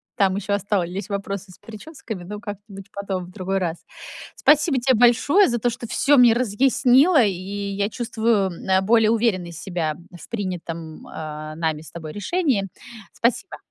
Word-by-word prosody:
Там 190 -2 +2
ещё 200 0 -2
остались 195 -1 -2
вопросы 200 -1 -4
с - - -17
причёсками, 225 - -9
ну, 205 +4 -7
как-нибудь 205 -2 -9
потом, 195 -2 -4
в 180 - -14
другой 195 0 -2
раз. 175 -2 -2 0.6
Спасибо 300 -1 +3
те 255 +1 +3
большое 245 - +5
за 240 -1 -1
то, 245 - +1
что 240 +1 -6
всё 285 +5 +3
мне 245 -2 +7
разъяснила, 255 - +4
и 205 - +2 0.4
я 200 +1 -1
чувствую, 225 -3 0
м, - - -7 0.2
э, 190 0 +4
более 220 +2 +4
уверенной 210 -7 0
себя, 170 -1 -3
м, 170 +3 -11
в - - -13
принятым, 170 -6 -5
а, 155 0 -7
нами 160 -2 -2
с 160 - -13
тобой 160 -2 -8
решении. 255 - 0 0.5
Спасибо. 250 +11 -1
205 Hz, 165 wpm, -22 LUFS, 180-240 Hz, 0.6 s, мне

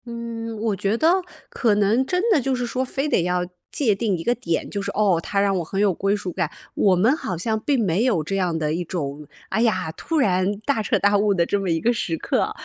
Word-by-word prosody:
嗯， 230 -1 -6
我 215 -2 0
觉 200 +3 0
得 340 +7 +3 0.3
可 225 -4 +1
能 210 +5 +3
真 360 +7 -1
的 325 -9 +4
就 265 +1 0
是 245 -1 -2
说， 255 +2 -1
非 270 +3 -2
得 290 - +2
要 180 +1 0 0.3
界 245 -8 +2
定 200 -3 0
一 165 - -6
个 240 - +2
点， 170 -9 -2
就 200 - -3
是， - - -4
哦， 200 -5 +2
它 200 - -1
让 200 -1 +2
我 - - -2
很 195 +5 -4
有 205 -2 +3
归 195 +4 0
属 190 -4 -5
感， 175 -4 -1 0.2
我 195 - +3
们 220 +10 +3
好 185 - -4
像 220 +6 -1
并 270 +4 0
没 195 +1 +1
有 210 -11 +2
这 195 +6 -3
样 180 -4 0
的 155 -1 -1
一 175 +2 -2
种， 150 -4 -5 0.2
哎 220 - 0
呀， 185 -8 +1
突 330 - -3
然 185 -7 +2
大 280 -6 +1
彻 - - +1
大 205 0 +3
悟 205 0 +2
的 170 -2 +2
这 200 - 0
么 195 -2 -2
一 165 -1 +1
个 240 +8 +2
时 170 -7 -2
刻， - - 0
205 Hz, 270 characters per minute, -23 LUFS, 180-235 Hz, 0.3 s, 的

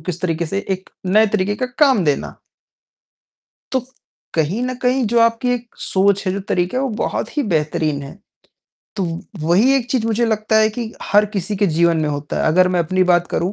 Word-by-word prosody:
किस 175 +2 -5
तरीके 165 -2 -1
से 195 - -2
एक 190 0 -3 0.2
नए 215 +4 +4
तरीके 205 0 0
का 255 - -2
काम 265 - +4
देना। 145 -2 -1 1.4
तो, 260 - +2 0.5
कहीं 165 +9 0
न 255 0 -2
कहीं 250 0 +2
जो 235 - +3
आपकी 230 +2 +2
एक 240 -1 -4
सोच 195 0 +1
है, 185 - +1
जो 200 - -3
तरीका 180 +8 0
है - - 0
वो 270 - 0
बहुत - - -3
ही 290 - +2
बेहतरीन 150 -1 0
है। 140 +8 -10 0.8
तो 195 - -1 0.4
वही 195 - +3
एक 245 -2 -3
चीज़ 235 -4 0
मुझे 230 +1 +1
लगता 220 0 +1
है 215 0 +5
कि 225 0 -5
हर 205 +1 +3
किसी 200 +2 -2
के 200 - +2
जीवन 170 0 +2
में 150 - 0
होता 145 0 -4
है, - - 0
अगर 180 +3 +4
मैं 175 - +3
अपनी 185 +3 +1
बात 175 0 +3
करूँ, 180 +4 -1
195 Hz, 205 wpm, -19 LUFS, 170-230 Hz, 1.4 s, है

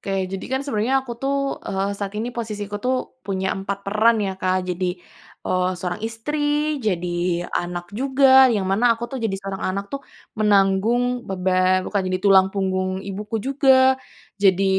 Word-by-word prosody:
Oke, - - -6 0.2
jadi 195 - -3
kan 265 0 0
sebenarnya 250 -2 0
aku 240 - -6
tuh, 275 0 -1
eee, 195 +1 -1
saat 200 0 -5
ini 235 +3 -2
posisi 215 -3 -4
ku 205 +1 -5
tuh 255 +1 +1 0.3
punya 190 -3 -2
4 195 +1 -4
peran 220 +3 +3
ya, 195 -2 -1
Kak, 185 0 0
jadi, 180 +1 -1 0.6
eee, 185 0 +1
seorang 180 -1 -4
istri, 295 +5 -1
jadi 175 -1 -1
anak 175 0 -3
juga, 265 +1 +5
yang 210 -5 0
mana 195 +6 +1
aku 235 - -5
tuh 265 - -3
jadi 195 -3 -1
seorang 195 0 -6
anak 200 +1 -3
tuh, 275 - -3 0.4
menanggung 215 +5 +2
beban 185 0 +2
bukan 205 - 0
jadi 185 0 -1
tulang 190 -1 +6
punggung 185 -1 -1 0.2
ibuku 210 +3 -4
juga, 265 -1 +5 0.5
jadi, 195 -1 +4
200 Hz, 165 wpm, -22 LUFS, 190-245 Hz, 0.6 s, tulang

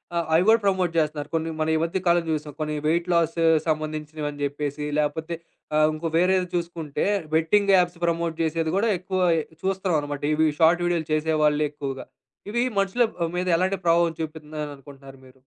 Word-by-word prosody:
ఆహ్, 170 -1 0
అవి 165 +3 +5
గూడా 225 +1 +6
ప్రమోట్ 185 -3 +2
జేస్తున్నారు. 150 -2 -1
కొన్ని 165 0 -1
మనం 155 0 +1
ఈ - - +3
మధ్య 170 +3 -1
కాలంలో 170 0 +3
జూసాం. 150 -1 -3
కొన్ని 155 0 -2
వెయిట్ 170 +2 +1
లాసు 165 0 +2 0.2
సంబంధించినవని 155 -1 -3
జెప్పేసి 145 +1 -3
లేపోతే 160 +3 -2 0.4
ఆహ్, 155 0 +5
ఇంకో 155 +2 -3
వేరేది 185 +1 +2
చూసుకుంటే 165 -4 -3 0.3
బెట్టింగ్ 195 +5 +3
యాప్స్ 175 -1 +1
ప్రమోట్ 170 -1 -1
జేసేది 160 +1 0
గూడా 225 +3 +2
ఎక్కువ 185 0 -3 0.4
చూస్తున్నాం 190 -3 0
అన్నమాట. 145 -1 -5
ఇవి 160 0 +3
షార్ట్ 170 +2 +4
వీడియోలు 170 -3 0
చేసేవాళ్ళే 155 -1 +2
ఎక్కువగా. 140 -2 -6 0.5
ఇవి 240 +2 +1 0.2
మనుషుల 195 +5 +2 0.2
ఆహ్, 165 - -4
మీద 180 - -1
ఎలాంటి 185 +2 0
ప్రభావం 170 0 +3
చూపిత్తుందననుకుంటున్నారు 150 -3 -8
మీరు? 130 +1 -19
160 Hz, 160 wpm, -24 LUFS, 150-175 Hz, 0.5 s, గూడా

